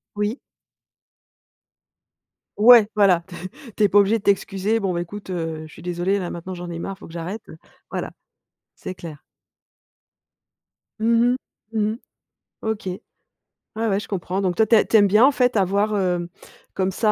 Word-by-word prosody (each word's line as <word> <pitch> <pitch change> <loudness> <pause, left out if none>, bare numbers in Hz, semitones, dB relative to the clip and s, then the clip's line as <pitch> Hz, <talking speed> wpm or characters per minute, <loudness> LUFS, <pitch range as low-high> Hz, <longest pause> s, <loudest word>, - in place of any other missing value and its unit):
Oui. 210 +5 -2 2.2
Ouais, 225 0 +8
voilà, 195 -5 +4
t 180 - -10 0.4
tu 215 - +2
es 205 - +6
pas 205 - +5
obligé 205 +3 +3
de 205 - -11
t'excuser: 200 +2 +1
«Bon 195 -3 -1
ben 175 -1 -1
écoute, 200 +3 -8
heu, 165 -3 -4
je - - -17
suis 165 - -13
désolé, 180 +3 0
là 180 -3 -4
maintenant 180 +2 -6
j'en 175 0 -7
ai 170 - -5
marre, 195 +2 -5
il - - -29
faut - - -11
que 165 - -14
j'arrête». 180 +6 -5 0.5
Voilà, - - -3 0.6
c'est 185 - -8
clair. 160 -5 -10 1.8
Mmh 235 +2 +3 0.4
mh, - - -2
mmh 210 0 +1
mh. - - -8 0.7
OK. 220 -2 -3
Ouais, 185 +4 -8 0.7
ouais, 195 -1 +1
je - - -8
comprends. 190 0 -3
Donc 185 -2 0
toi 220 - +4
tu 225 - +4
tu 225 - +5
aimes 205 -1 +6
bien, 210 +5 +6
en 285 - +5
fait, 250 -2 +1
avoir, 200 +2 +1
heu, 180 -3 0 0.4
comme 190 0 0
ça, 215 +3 +1
195 Hz, 175 wpm, -22 LUFS, 175-215 Hz, 2.2 s, Ouais